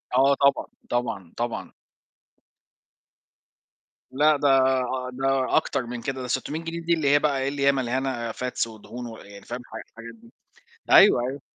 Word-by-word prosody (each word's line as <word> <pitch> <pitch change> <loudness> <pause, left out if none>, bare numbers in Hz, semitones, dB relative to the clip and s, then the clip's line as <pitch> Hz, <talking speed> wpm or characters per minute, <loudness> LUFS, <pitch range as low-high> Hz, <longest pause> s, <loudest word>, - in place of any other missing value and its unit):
آه، 135 +2 +5
طبعًا، 140 -1 +3 0.2
طبعًا، 105 -8 -3
طبعًا. 120 0 -4 2.4
لأ، 150 +2 +3
ده 145 - +1 0.7
ده 135 0 0
أكتر 135 -5 0
من 120 0 -6
كده 130 0 -4
ده 125 - -5
600 150 +5 -2
جنيه 165 +1 -5
دي 170 +1 +1
اللي 155 -4 0
هي 145 +1 +5
بقى 145 -3 0
إيه، 135 - -1
اللي 140 -1 -2
هي 140 - +6
مليانه 130 -2 -2
fats 125 -1 -2
ودهون 115 +2 -9
و 115 -1 -9
يعني 100 0 -13
فاهم، 120 +1 -5
الح 115 -2 -10
حاجات 115 0 -9
دي 115 +1 -20 0.6
أيوه، - - +7
أيوه. 140 +2 -6
130 Hz, 160 wpm, -25 LUFS, 120-140 Hz, 2.4 s, أيوه